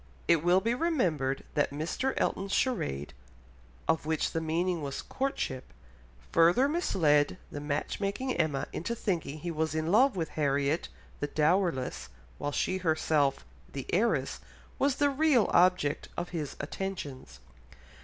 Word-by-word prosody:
It 165 -2 +4
will 180 +2 +4
be 230 +4 +1
remembered 180 - 0
that 145 - +2
Mr. 160 - -2
Elton's 195 +1 -1
charade, 75 - -1 0.7
of 160 0 +2
which 160 0 0
the 165 - -1
meaning 170 +2 0
was 140 -2 -4
"Courtship," 260 - -3 0.7
further 175 +11 +5
misled 170 - +2
the 145 - -5
match 145 0 -2
making 205 +6 -1
Emma 155 -5 0
into 230 +8 -3
thinking 170 -10 -2
he 175 - -3
was 155 -1 -1
in 160 +1 0
love 255 +4 +5
with 165 -4 -2
Harriet 145 +1 0 0.3
the 145 - -1
dowerless, 150 - 0 0.3
while 145 - -2
she 185 +5 0
herself, 155 - +1 0.3
the - - -5
heiress, 60 0 +1 0.4
was 275 -1 +2
the 285 -1 +2
real 275 -5 +3
object 180 -5 +3
of 175 0 -3
his 155 -5 -4
attentions. 145 - -5
165 Hz, 140 wpm, -30 LUFS, 145-195 Hz, 0.7 s, further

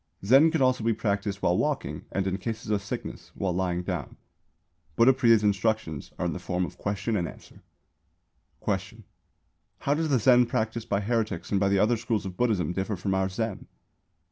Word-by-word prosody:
Zen 135 +9 +7
could 160 -4 +1
also 130 -2 +2
be 115 0 +2
practised 100 -2 -2
while - - +3
walking - - -2
and, 95 - -1
in 95 +1 -1
cases 115 +2 -4
of 105 -1 +1
sickness, 100 - -6
while 95 -2 -1
lying 90 -1 -1
down. 90 -6 -4 0.8
Buddhapriya's 115 -3 +5
instructions 100 -6 0
are 90 - -2
in 85 - -1
the - - -5
form 90 0 -1
of 75 - -11
question 100 +2 -2
and 85 -4 0
answer. - - -13 1.0
Question. 95 +3 -3 0.8
How 140 - +1
does 160 +1 -1
the 135 - +4
Zen 125 +1 +5
practised 110 0 -2
by 100 0 +1
heretics 110 -4 -2
and 100 - +2
by 100 0 +2
the 100 - +3
other 110 +4 +3
schools 110 -2 -2
of 95 -2 -6
Buddhism 105 -6 +1
differ 95 +3 -2
from 95 +2 -2
our 95 0 +1
Zen? 110 +1 -4
105 Hz, 185 wpm, -27 LUFS, 95-115 Hz, 1.0 s, Zen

